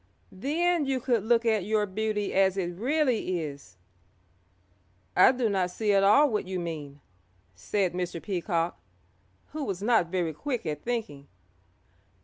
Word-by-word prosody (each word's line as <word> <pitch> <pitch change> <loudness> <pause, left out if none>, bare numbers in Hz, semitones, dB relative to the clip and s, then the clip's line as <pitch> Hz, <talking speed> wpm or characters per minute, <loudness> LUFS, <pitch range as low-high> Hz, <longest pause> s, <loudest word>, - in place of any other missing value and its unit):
Then 310 - 0
you 265 -1 0
could 240 -4 0
look 235 +1 +2
at 220 -4 +2
your 210 +1 +1
beauty 210 +1 -2
as 190 0 +3
it 175 -2 -2
really 240 - 0
is." 140 - -8 1.4
"I 185 - +7
do 250 -3 0
not 190 -3 0
see 210 +3 0
at 195 0 +4
all 245 +10 +6
what 215 -7 -2
you 185 -1 -3
mean," 150 -4 -6 0.5
said 185 - -1
Mr. 180 -1 -3
Peacock, 175 -2 -2 0.7
who 305 -1 -4
was 195 -6 -4
not 225 -6 +3
very 170 -2 -1
quick 250 - -4
at 150 -2 -3
thinking. 210 -13 -4
200 Hz, 145 wpm, -27 LUFS, 175-235 Hz, 1.4 s, I